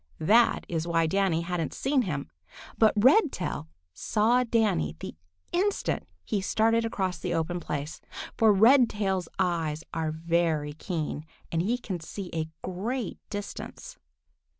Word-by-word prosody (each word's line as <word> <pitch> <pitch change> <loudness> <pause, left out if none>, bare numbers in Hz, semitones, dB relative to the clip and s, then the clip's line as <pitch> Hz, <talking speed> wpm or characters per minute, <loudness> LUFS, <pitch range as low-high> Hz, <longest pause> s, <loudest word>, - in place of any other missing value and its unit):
That 225 +9 +4
is 165 -1 -2
why 165 -1 +2
Danny 185 -1 +1
hadn't 170 -3 -3
seen 270 0 +2
him. 150 - -3 0.4
But 220 -1 +4
Redtail 250 - +3 0.3
saw 230 - +2
Danny 215 - +1
the - - -6 0.4
instant 390 - 0 0.2
he 205 - -1
started 225 +3 +2
across 190 -6 -2
the - - -2
open 165 +2 -1
place, 150 -2 -5 0.3
for 220 -2 +5
Redtail's 210 -5 +4
eyes 165 -4 0
are 160 -1 -1
very 160 -2 0
keen, 155 -2 -4 0.2
and 165 - +1
he 225 +7 +1
can 195 -7 -5
see 180 +3 -7
a 160 -1 -2
great 220 +7 -3
distance. 205 -1 -7
185 Hz, 130 wpm, -28 LUFS, 160-225 Hz, 0.4 s, for